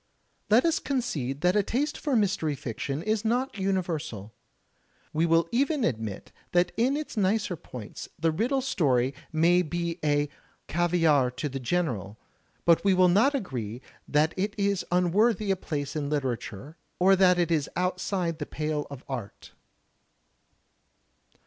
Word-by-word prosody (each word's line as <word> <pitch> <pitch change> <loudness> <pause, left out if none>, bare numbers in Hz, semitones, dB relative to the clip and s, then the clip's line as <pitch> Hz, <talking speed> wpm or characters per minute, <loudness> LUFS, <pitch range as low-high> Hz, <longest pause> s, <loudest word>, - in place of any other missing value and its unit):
Let 225 +7 +5
us 330 - +2
concede 145 - -2
that 180 +2 +3
a 210 - +5
taste 285 +9 -1
for 285 -4 -1
mystery 190 -8 +1
fiction 135 +5 -4
is 215 0 0
not 245 +4 0
imiversal. 165 - -2 0.8
We 160 +2 +2
will 165 0 +3
even 275 +3 +1
admit 110 - -3 0.2
that 175 0 +3
in 255 +5 +2
its 305 -3 -5
nicer 205 -2 +1
points 125 -8 -9
the 165 +1 +1
riddle 245 - 0
story 135 - +1 0.2
may 170 +3 +4
be 170 +1 -3 0.7
"caviare 165 -6 +3
to 150 - -2
the 135 -1 -5
general," 120 - -2 0.5
but 170 -1 +5
we 195 -2 +4
will 185 0 +5
not 230 +11 +4
agree 125 - -4 0.3
that 150 +2 +2
it 200 +2 -1
is 200 -1 +1
unworthy 195 +4 +2
a - - +3
place 145 -6 -4
in 145 -2 -2
literature 135 -1 -3 0.2
or 190 +2 +5
that 180 -1 +5
it 175 -1 +1
is 150 -3 +1
outside 180 -2 -1
the 150 - -4
pale 150 -1 -2
of 140 -2 -9
art. 120 -7 -7
175 Hz, 145 wpm, -27 LUFS, 145-200 Hz, 0.8 s, Let